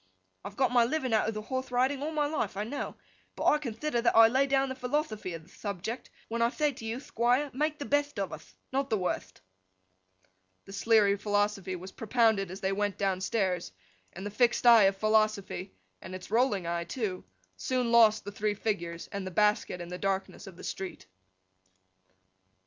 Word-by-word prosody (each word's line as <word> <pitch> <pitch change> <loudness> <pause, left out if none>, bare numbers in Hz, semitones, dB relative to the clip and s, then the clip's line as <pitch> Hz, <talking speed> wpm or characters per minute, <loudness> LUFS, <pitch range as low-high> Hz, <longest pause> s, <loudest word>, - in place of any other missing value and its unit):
I've 200 +1 -8
got 260 -2 +2
my 245 -1 +5
living 255 -1 -1
out 220 - +3
of 220 - -2
the 215 - -4
horthe 260 +3 -3
riding 260 +3 +1
all 300 - -2
my 305 -2 0
life, 290 -10 -2
I 205 - -1
know; 260 +7 -5 0.4
but - - -4
I 300 - +5
conthider 240 0 -2
that 235 - +2
I 225 0 +8
lay 265 +3 +2
down 270 0 +2
the - - -2
philothophy 250 - -2
of 165 - -9
the 170 - -21
thubject 205 +4 -5 0.2
when 235 +1 -2
I 235 - +4
thay 300 +3 0
to 230 - -10
you, 225 +2 -3
Thquire, 255 +2 0
make 300 +3 -1
the 285 - -5
betht 290 -1 0
of 195 -2 -2
uth: - - -11 0.2
not 275 +1 0
the 220 - +2
wurtht!' 180 - -3 1.2
The 195 - -11
Sleary 205 -1 +3
philosophy 205 -2 0
was 185 +2 -8
propounded 220 -4 +2
as 190 +2 -8
they 190 - 0
went 205 0 -1
downstairs 190 - -1 0.4
and 190 - -8
the 205 - -4
fixed 240 +3 +2
eye 230 -4 +8
of 195 0 +2
Philosophy—and 195 - -1
its 185 +1 -10
rolling 225 -6 +2
eye, 170 0 -2
too—soon 185 - -3
lost 220 -2 +5
the 205 - -5
three 205 +1 -1
figures 170 -6 -3
and 200 -2 -4
the - - -2
basket 210 -1 +1
in 175 - -7
the 180 0 -6
darkness 195 +1 -2
of 185 -3 -11
the - - -11
street. 190 -1 -6
215 Hz, 190 wpm, -29 LUFS, 195-250 Hz, 1.2 s, I